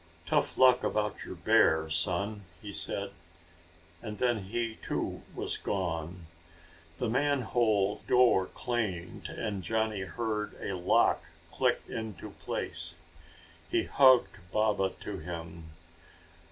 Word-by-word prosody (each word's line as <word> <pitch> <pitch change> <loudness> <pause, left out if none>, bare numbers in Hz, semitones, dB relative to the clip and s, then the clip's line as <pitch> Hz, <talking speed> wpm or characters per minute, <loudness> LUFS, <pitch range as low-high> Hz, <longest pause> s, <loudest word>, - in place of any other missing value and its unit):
"Tough - - +1
luck 130 -1 +6
about 105 0 -1
your - - -7
bear, 80 0 +4
son," 90 +6 0 0.2
he 105 -1 -8
said, 100 0 -2 0.9
and 105 -1 -6
then 120 -5 +1
he, 115 +2 -2
too, - - -3
was - - -1
gone. 85 -2 -3 0.7
The 120 - -1
manhole 120 -6 +1
door 120 -7 +5
clanged 105 -8 -3
and 105 -4 -3
Johnny 110 +1 0
heard 105 +1 -3
a 100 - -3
lock 90 0 +3 0.3
click - - +1
into 110 -3 -6
place. - - -4 0.7
He - - +2
hugged 130 -3 +5
Baba 105 -3 +2
to 100 -2 -5
him. 85 0 -7
105 Hz, 115 wpm, -30 LUFS, 95-115 Hz, 0.9 s, luck